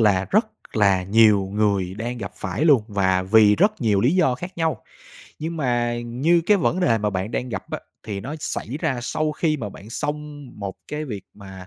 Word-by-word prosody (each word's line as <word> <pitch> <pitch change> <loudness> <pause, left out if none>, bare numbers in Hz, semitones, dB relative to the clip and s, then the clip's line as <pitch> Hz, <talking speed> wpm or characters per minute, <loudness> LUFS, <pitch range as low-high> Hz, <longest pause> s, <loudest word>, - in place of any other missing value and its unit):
là, 95 -4 +3
rất - - +3 0.3
là 100 -3 +4
nhiều 100 -1 +4
người 100 -3 +1
đang 120 +3 -4
gặp 100 -5 -6
phải 105 - -2
luôn, 140 -9 +5
và 95 -2 +1
vì 105 +1 +5
rất 205 0 +2
nhiều 105 -4 +2
lý 130 - +3
do 160 -9 +3
khác 180 +8 -8
nhau. 160 -1 0 0.6
Nhưng 165 +2 -4
mà 120 -4 0
như 140 +9 +2
cái 210 - +5
vẫn 180 0 0
đề 115 -10 +3
mà 105 0 0
bạn 95 +3 -3
đang 125 +1 -3
gặp 95 -4 -6
á, - - -3 0.2
thì 100 -3 -5
nó 135 +8 -6
xảy - - -3
ra 140 -7 0
sau 155 +4 -1
khi 155 0 0
mà 110 -7 -5
bạn 100 +2 -12
xong 150 +2 -5
một 100 -2 -4
cái 150 +1 -4
việc 105 -9 -6
mà, 95 -2 -11
115 Hz, 210 wpm, -23 LUFS, 100-150 Hz, 0.6 s, luôn